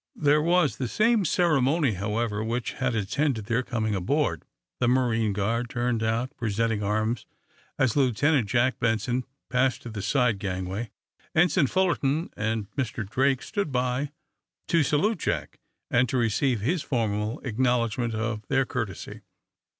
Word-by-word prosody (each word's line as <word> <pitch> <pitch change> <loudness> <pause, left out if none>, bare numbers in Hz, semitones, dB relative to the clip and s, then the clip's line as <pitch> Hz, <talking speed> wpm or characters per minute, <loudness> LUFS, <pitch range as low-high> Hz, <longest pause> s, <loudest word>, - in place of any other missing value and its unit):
There 150 0 +3
was 170 -1 +2
the 130 - -2
same 215 - +2
ceremony, 155 -4 +2
however, 105 +2 -2
which 115 +2 -2
had 130 -3 -1
attended 110 +2 0
their 115 +2 +1
coming 110 -4 -2
aboard. 130 - 0 0.3
The 125 - +2
marine 120 -4 +2
guard 115 +4 -1
turned 120 -2 -1
out, 115 +3 -1
presenting 110 -1 0
arms 110 +3 -1 0.5
as 130 -4 +2
Lieutenant 135 -1 +2
Jack 120 +1 +2
Benson 120 +2 0 0.3
passed 125 0 +1
to 120 - -6
the 110 -2 -5
side 120 -1 +1
gangway. 95 +3 -3 0.5
Ensign 160 -2 +4
Fullerton 165 -4 +1
and 110 -1 -2
Mr. 120 -6 -3
Drake 130 +4 +1
stood 200 -8 -2
by 125 +2 0 0.6
to 170 - +4
salute 155 - +1
Jack, - - -3 0.3
and 125 0 +3
to 130 - 0
receive 120 0 +1
his 155 - 0
formal 110 -4 -1
acknowledgment 120 -1 0
of 110 -1 -3
their 135 -1 +2
courtesy. 115 -7 -5
120 Hz, 140 wpm, -26 LUFS, 110-140 Hz, 0.6 s, Ensign